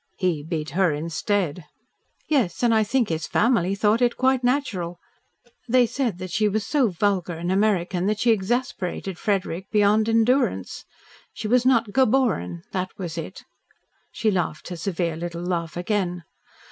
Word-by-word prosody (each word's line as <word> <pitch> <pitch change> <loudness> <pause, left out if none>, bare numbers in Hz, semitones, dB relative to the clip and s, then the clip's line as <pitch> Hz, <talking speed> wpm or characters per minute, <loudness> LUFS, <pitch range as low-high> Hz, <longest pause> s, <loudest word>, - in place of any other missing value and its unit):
"He 180 -5 0
beat 155 -1 -4
her 185 +1 +2
instead." 165 +2 -2 0.6
"Yes, 255 - 0
and 235 -1 +4
I 220 -1 +4
think 240 +2 0
his 160 -1 -2
family 200 -5 +2
thought 210 +3 +2
it 240 -1 +2
quite 260 -1 +2
natural. 210 -10 -1 0.7
They 250 +1 +5
said 235 -4 -2
that 185 -1 -7
she 215 +3 +2
was 210 0 -1
so 280 -1 +2
vulgar 185 -1 0
and 175 +2 -3
American 190 -2 +1
that 210 0 0
she 235 - +3
exasperated 195 -4 -2
Frederick 190 -3 -2
beyond 210 +1 +3
endurance. 225 - +1 0.5
She - - -5
was 250 +2 +3
not 230 -5 +3
geboren, 220 - +1
that 185 0 -2
was 175 -4 -5
it." 170 +3 -7 0.7
She 220 - 0
laughed 175 -5 -2
her 180 - -5
severe 170 -1 -2
little 170 +1 -5
laugh 170 -2 -3
again. 180 -2 -1
195 Hz, 155 wpm, -24 LUFS, 175-230 Hz, 0.7 s, They